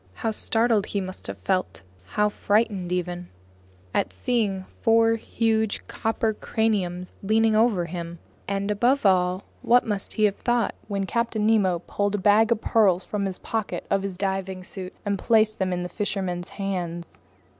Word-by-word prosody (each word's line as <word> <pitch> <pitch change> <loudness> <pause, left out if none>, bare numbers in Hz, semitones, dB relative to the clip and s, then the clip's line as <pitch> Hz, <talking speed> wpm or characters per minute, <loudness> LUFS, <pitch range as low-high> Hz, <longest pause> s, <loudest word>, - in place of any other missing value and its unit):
How 225 - -1
startled 225 -1 +2
he 200 - -1
must 185 -1 -4
have - - -5
felt, 185 - -2 0.2
how 210 - +1
frightened 205 -3 0
even, 180 0 -3 0.6
at 95 - 0
seeing 200 - -1 0.2
four 225 0 +4
huge, 220 -1 0
copper 225 0 -1
craniums 190 -6 -1
leaning 220 +2 +3
over 215 -5 +3
him! 170 0 -6 0.3
And 200 +1 -1
above 245 +5 +2
all, 185 0 +3 0.2
what 245 +1 +4
must 205 -3 -2
he 215 - 0
have 205 -2 +3
thought 240 -3 +1
when 200 -2 -2
Captain 230 0 -1
Nemo 190 -6 +2
pulled 205 0 -1
a - - 0
bag 210 +3 +4
of 225 -2 +2
pearls 195 -5 +3
from 200 -2 -2
a 190 - -3
pocket 220 +3 -4
in 195 - +3
his 195 -2 -4
diving 190 -1 -2
suit 185 0 -7
and 200 -1 -1
placed 215 -1 +2
it 190 - +2
in 180 0 -1
the - - -3
fisherman's 180 -2 -3
hands? 175 -4 -4
200 Hz, 165 wpm, -25 LUFS, 185-220 Hz, 0.6 s, four